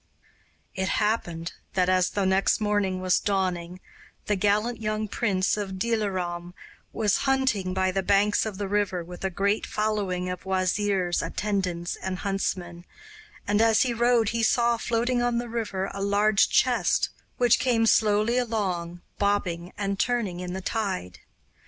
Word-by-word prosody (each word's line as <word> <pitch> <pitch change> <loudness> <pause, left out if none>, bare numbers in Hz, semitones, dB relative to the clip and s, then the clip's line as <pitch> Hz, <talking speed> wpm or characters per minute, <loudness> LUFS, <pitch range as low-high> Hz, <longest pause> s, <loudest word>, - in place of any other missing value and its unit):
It 190 -1 -2
happened 175 -6 -1 0.2
that, 185 -1 +2
as 185 -1 +3
the 200 -2 -1
next 190 +1 +2
morning 205 -3 0
was 185 -1 +2
dawning, 185 -3 -2 0.5
the 210 - +1
gallant 210 +4 +1
young 215 0 -1
prince 195 -2 0
of 195 -2 -4
Dilaram 185 -5 -2 0.4
was 210 -3 +1
hunting 230 -9 +1
by 190 0 +1
the 195 +1 0
banks 200 +2 +3
of 215 -3 -4
the 200 0 -3
river, 195 -3 0
with 175 +2 -10
a 190 - +1
great 200 +3 0
following 205 -4 -1
of 180 -1 -5
wazirs, 190 -1 0
attendants, 185 -4 -2
and 190 0 -4
huntsmen, 185 -3 -3 0.6
and 205 +1 +2
as 225 +2 +4
he 250 -2 -1
rode 235 -2 +3
he 230 0 -1
saw 235 +1 +3
floating 240 +2 0
on 240 -1 +1
the 240 0 -2
river 205 -5 -3
a 195 - -5
large 200 +1 +3
chest, - - +2 0.3
which 245 -1 +4
came 235 -3 +2
slowly 215 +2 +3
along, 185 -7 -2 0.2
bobbing 185 -4 0
and 200 -1 -2
turning 230 -8 0
in 180 0 -5
the 190 - -4
tide. 190 - -3
200 Hz, 150 wpm, -26 LUFS, 185-220 Hz, 0.6 s, as